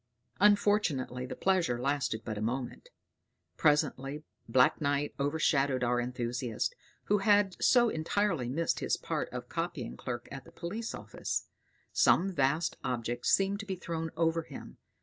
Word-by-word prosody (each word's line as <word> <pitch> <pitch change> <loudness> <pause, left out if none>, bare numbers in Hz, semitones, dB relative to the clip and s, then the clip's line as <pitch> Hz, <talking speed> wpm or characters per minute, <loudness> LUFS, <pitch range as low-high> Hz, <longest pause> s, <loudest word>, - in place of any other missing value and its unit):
Unfortunately 200 -11 +2
the - - -6
pleasure 175 -11 +1
lasted 130 -4 -1
but 110 - -3
a 105 - -5
moment. 125 - -3 0.7
Presently 150 -1 +1 0.3
black 125 +5 +4
night 145 0 0
overshadowed 140 -2 +1
our 120 0 +2
enthusiast, 120 -1 -2 0.3
who 205 0 +2
had 205 -2 +3
so 240 -2 +6
entirely 165 - 0
missed 165 +6 0
his - - 0
part - - -3
of - - -6
copying - - -4
clerk 120 - -5
at 135 0 -8
a - - -14
police 215 +7 -5
office; - - -4 0.5
some 190 +2 +4
vast 150 +3 +1
object 120 0 -2
seemed 195 +1 +3
to 205 - -6
be 190 - -2
thrown 165 -2 -4
over 165 0 +2
him. - - -10
145 Hz, 145 wpm, -31 LUFS, 125-185 Hz, 0.7 s, so